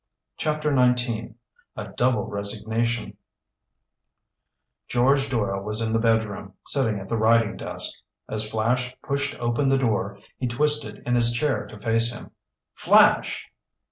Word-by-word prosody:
CHAPTER 150 -1 0
XIX 125 -3 +1 0.4
A - - -6
DOUBLE 120 -4 +1
RESIGNATION 110 +3 -2 1.7
George 135 +3 +2
Doyle 100 -6 -1
was 105 +2 -3
in 110 -1 -1
the 115 - +2
bedroom, 110 -4 0
sitting 115 -7 +2
at 95 - -9
the 115 - -1
writing 110 0 +3
desk. - - -4 0.3
As 110 0 -1
Flash 125 +3 -1
pushed 140 0 -2
open 120 +4 0
the 135 - +3
door, 105 -5 -1 0.2
he 125 - -1
twisted 140 -3 -1
in 125 - 0
his 120 -1 +4
chair 140 +4 0
to 110 - -12
face 115 +2 +2
him. 120 - -10 0.4
"Flash!" - - +4
115 Hz, 135 wpm, -24 LUFS, 110-125 Hz, 1.7 s, his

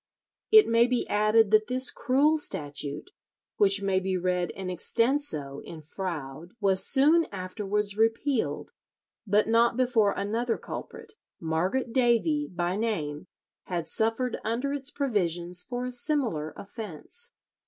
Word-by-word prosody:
It 435 -1 +8
may 230 +1 +4
be 250 -1 -1
added 215 +1 +3
that 215 0 +4
this 255 +1 +2
cruel 295 +5 +2
statute, 145 - -2 0.5
which 200 0 +5
may 195 -1 +1
be 190 0 -2
read 180 -1 -1
in 190 -1 -7
extenso 185 - 0
in 165 - -9
Froude, 160 -1 -7
was 195 -2 +4
soon 305 +5 +5
afterwards 200 +2 -3
repealed, 225 +4 0 0.6
but 205 +2 +2
not 230 +1 +3
before 240 -5 +2
another 225 +4 -2
culprit, 450 -2 -8 0.3
Margaret 185 +10 -1
Davy 265 +4 +2
by 175 +1 -2
name, 175 -8 -3 0.4
had 170 -3 -4
suffered 225 +3 -1
under 245 +6 -2
its 280 -1 -3
provisions 180 - -1
for 245 +4 -5
a 250 - -4
similar 245 - -1
offence. 220 - -7
215 Hz, 130 wpm, -27 LUFS, 180-250 Hz, 0.6 s, It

